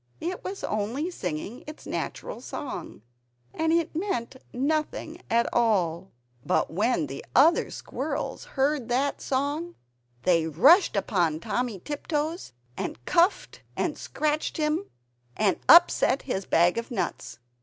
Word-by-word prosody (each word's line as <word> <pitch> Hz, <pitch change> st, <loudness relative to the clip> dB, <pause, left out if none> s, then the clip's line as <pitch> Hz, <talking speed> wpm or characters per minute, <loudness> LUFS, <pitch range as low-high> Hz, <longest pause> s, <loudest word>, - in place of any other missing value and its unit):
It 355 Hz, +3 st, -4 dB
was 385 Hz, +1 st, -6 dB
only 235 Hz, -, -2 dB
singing 180 Hz, -, -5 dB
its 305 Hz, -, -10 dB
natural -, -, -4 dB
song, 260 Hz, -, -7 dB, 0.5 s
and 320 Hz, 0 st, 0 dB
it 335 Hz, -1 st, +1 dB
meant 320 Hz, -, -2 dB, 0.2 s
nothing 310 Hz, +5 st, -2 dB
at 235 Hz, +1 st, +3 dB
all. 190 Hz, -6 st, +1 dB, 0.3 s
But -, -, +1 dB
when 205 Hz, -3 st, +1 dB
the 135 Hz, 0 st, -7 dB
other 320 Hz, +6 st, +5 dB
squirrels -, -, -4 dB
heard 270 Hz, -2 st, +1 dB
that 270 Hz, +4 st, 0 dB
song, 290 Hz, +6 st, -2 dB, 0.5 s
they 165 Hz, -3 st, +3 dB
rushed 280 Hz, -, +5 dB
upon 175 Hz, -6 st, +1 dB
Timmy 240 Hz, +4 st, -2 dB
Tiptoes 300 Hz, -, -3 dB, 0.2 s
and 120 Hz, +1 st, -5 dB
cuffed 345 Hz, +4 st, +2 dB, 0.2 s
and -, -, 0 dB
scratched 305 Hz, 0 st, -2 dB
him, 310 Hz, +5 st, 0 dB, 0.5 s
and 210 Hz, -3 st, +2 dB
upset 335 Hz, -5 st, +6 dB
his 195 Hz, -7 st, -3 dB
bag 175 Hz, +6 st, +3 dB
of 235 Hz, -, -7 dB
nuts. 235 Hz, -7 st, -3 dB
265 Hz, 125 wpm, -27 LUFS, 200-320 Hz, 0.5 s, upset